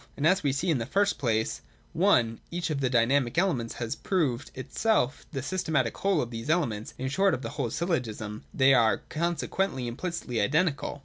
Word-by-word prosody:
And, 150 - -1
as 185 +4 +4
we 145 - +1
see, 165 +6 0
in 145 - +1
the 115 - -3
first 200 +7 +1
place, 110 -4 0 0.3
(i) 115 -1 +3
each 170 -1 -2
of 140 -2 -1
the 130 - +1
dynamic 125 +2 +2
elements 140 -11 +1
has 120 -1 -3
proved 145 -10 -1
itself 145 - 0
the 135 -5 -4
systematic 150 -7 0
whole 195 -6 +1
of 120 - -7
these 115 +4 -6
elements, 120 -11 0
in 130 - -3
short 195 +8 +2
a - - -3
whole 130 -2 -2
syllogism, 110 - -3
— - - -33
they 135 +1 +7
are 115 -4 +3
conse 170 0 -1
quently 190 -10 -1
implicitly 125 -1 -3
identical. 145 - 0
140 Hz, 190 wpm, -28 LUFS, 120-170 Hz, 0.3 s, they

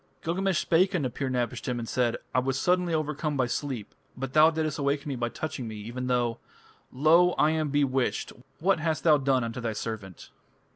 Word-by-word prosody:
Gilgamesh 185 +2 0
spake 185 +5 +2
unto 145 -7 0
Pir 130 +2 -3
napishtim 125 0 -2
and 115 -1 -4
said: 120 -1 0 0.2
"I - - +4
was 135 +1 -1
suddenly 180 +1 +2
overcome 150 -1 -1
by 130 - +2
sleep.... 125 -3 -4 0.2
But 135 0 -5
thou 155 +1 +7
didst 155 -2 -2
awaken 140 +1 -1
me 135 - -2
by 120 -1 -2
touching 135 -3 -5
me, 110 - -6
even 120 +5 -5
thou.... 120 -2 0 0.5
Lo! 165 +6 +4
I 150 - +3
am 155 -2 0
bewitched. 135 -3 0 0.3
What 185 +1 +2
hast 160 0 -1
thou 155 -3 +5
done 135 -2 +2
unto 115 +2 -4
thy 115 -1 -2
servant?" 105 -5 -6
140 Hz, 190 wpm, -27 LUFS, 125-155 Hz, 0.5 s, thou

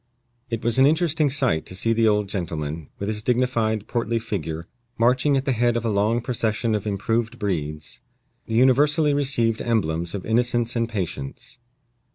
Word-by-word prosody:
It 115 -1 -3
was 120 +2 +2
an 135 - +7
interesting 160 -1 +2
sight 130 - +1
to 90 - -6
see 115 +5 +2
the 115 0 +3
old 105 -1 +2
gentleman, 80 -5 -4
with 100 - -4
his 105 0 -2
dignified, 115 -3 0
portly 115 -1 -1
figure, 85 -8 -4 0.3
marching 125 +4 +3
at 135 - -2
the 135 - +1
head 120 -1 +1
of 115 - -3
a 115 - +1
long 105 +4 +1
procession 115 -1 0
of 105 0 -2
improved 115 +4 -1
breeds 75 -8 -4 0.5
the 110 - -2
universally 145 +5 +4
received 125 -6 +1
emblems 85 -7 -1
of 100 - -6
innocence 120 +1 +1
and 115 -1 0
patience. 90 - -5
115 Hz, 170 wpm, -23 LUFS, 100-125 Hz, 0.5 s, an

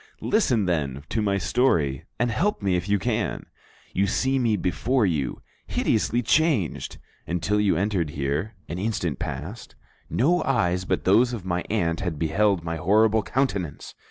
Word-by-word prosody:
Listen, 130 - +2
then, 70 -6 -1
to 110 - 0
my 100 -2 +1
story 85 - +1
and 120 0 +1
help 180 - 0
me 95 -2 +2
if 90 +2 -2
you 100 - +3
can. 110 +1 -2 0.5
"You 100 +2 +2
see 130 +6 +1
me 115 -4 +2
before 110 +7 +1
you, 75 -8 -2 0.2
hideously 120 +2 +1
changed. 145 - +1 0.3
Until 95 +5 0
you 100 -6 +2
entered 95 -4 0
here, 75 +9 -2
an 85 - -5
instant 90 - -2
past, - - -6 0.3
no 170 +9 +2
eyes 90 - +1
but - - -1
those 115 +6 +4
of 105 -6 -5
my 90 -1 -1
aunt 85 -6 0
had 90 -5 -3
beheld 95 +4 +1
my 85 0 -3
horrible 110 +5 +3
countenance. 100 - -2
100 Hz, 155 wpm, -25 LUFS, 85-115 Hz, 0.5 s, those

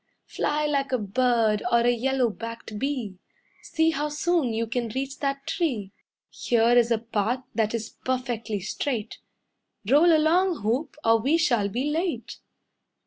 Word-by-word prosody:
Fly 300 +1 -1
like 280 -3 0
a 255 - +2
bird 220 0 +1
or 235 - +4
a 240 +1 +3
yellow 250 0 +1
backed 230 -1 -7
bee, 250 -9 -3 0.4
See 325 -1 +1
how 300 -1 -2
soon 300 -3 0
you 225 +1 -1
can 235 +1 -2
reach 270 +4 -4
that 275 -1 -2
tree. 240 - -2 0.4
Here 235 0 +2
is 240 -1 +4
a 230 - +3
path 230 +2 -2
that 220 0 0
is 225 0 -5
perfectly 240 -5 -2
straight. 225 +3 -3 0.7
Roll 300 +8 +5
along, 330 +1 +3
hoop, 245 +9 -1
or 225 0 +5
we 275 +8 +2
shall 240 -11 +2
be 240 +6 -2
late." 335 +3 -3
245 Hz, 150 wpm, -25 LUFS, 225-290 Hz, 0.7 s, Roll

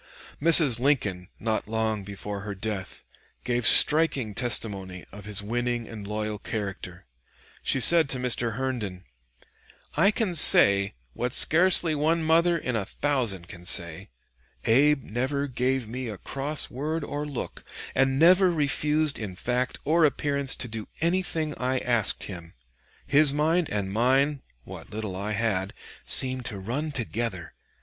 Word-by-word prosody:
Mrs. 155 -7 +5
Lincoln, 105 -10 -1
not 110 -2 -3
long 110 -2 -2
before 100 +1 -7
her 100 0 -7
death, 100 -2 -6 0.4
gave 120 -2 0
striking 145 -8 +4
testimony 100 -6 -1
of 100 0 -12
his 105 -1 -1
winning 120 +1 -3
and 105 -3 -9
loyal 105 0 -4
character. 95 - -7 0.6
She 135 - 0
said 160 +2 +7
to 135 - 0
Mr. 120 -2 -2
Herndon: 115 -8 -5 0.9
"I 195 - +3
can 210 -3 -2
say, 100 -10 +6 0.2
what 125 0 -3
scarcely 170 0 +5
one 160 +3 0
mother 170 +2 +2
in 125 -6 -4
a 105 - -1
thousand 115 -7 -3
can 85 0 -12
say, 85 -2 +1 0.6
Abe 135 +4 +3
never 130 +6 -3
gave 130 -2 -2
me 125 +3 -6
a 105 -3 -7
cross 145 +7 -2
word 150 +5 -4
or 145 +1 -5
look, 140 -4 -7 0.3
and 135 0 +1
never 180 +4 +4
refused 150 -1 -1
in 100 -5 -7
fact 125 +6 -3
or 165 +3 +2
appearance 140 -2 0
to 125 - -6
do 110 -2 -7
anything 165 -2 -2
I 130 +1 -1
asked 120 -4 +1
him. 85 -4 -10 0.5
His 145 0 +3
mind 160 +3 0
and 100 -2 -4
mine 135 +5 +1 0.2
what - - -11
little 105 -3 -6
I 100 +3 -4
had 100 -3 -2 0.3
seemed 130 -1 +4
to 110 - -5
run 130 +11 -4
together.... 115 - -4
125 Hz, 145 wpm, -25 LUFS, 105-145 Hz, 0.9 s, said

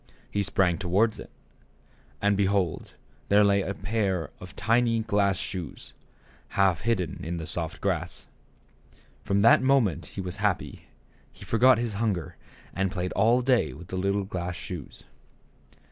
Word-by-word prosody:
He 105 - 0
sprang 95 -3 +1
toward 100 +4 +1
it, - - -9 0.9
and 100 0 +3
behold, 100 -3 0 0.3
there 105 +1 +6
lay 100 -1 +3
a 100 +1 -3
pair 95 -6 -1
of 90 0 -11
tiny 115 0 +2
glass 100 -2 +1
shoes, 90 -6 -6 0.6
half 95 -4 +3
hidden 95 -6 -1
in 85 +2 -3
the 80 - -5
soft 80 -1 -4
grass. - - -2 1.0
From 100 0 +1
that 115 - +7
moment 130 - +2
he - - -9
was 90 +1 -5
happy; 105 -2 -2 0.5
he - - -13
forgot 125 +2 +5
his 115 -2 -2
hunger, 95 -8 -1 0.4
and 95 0 0
played 90 -2 -3
all 115 +5 +3
day 120 - +2
with 85 +6 -12
the - - -4
little 100 +2 0
glass 90 -2 -4
shoes. 85 -5 -8
100 Hz, 145 wpm, -27 LUFS, 90-110 Hz, 1.0 s, that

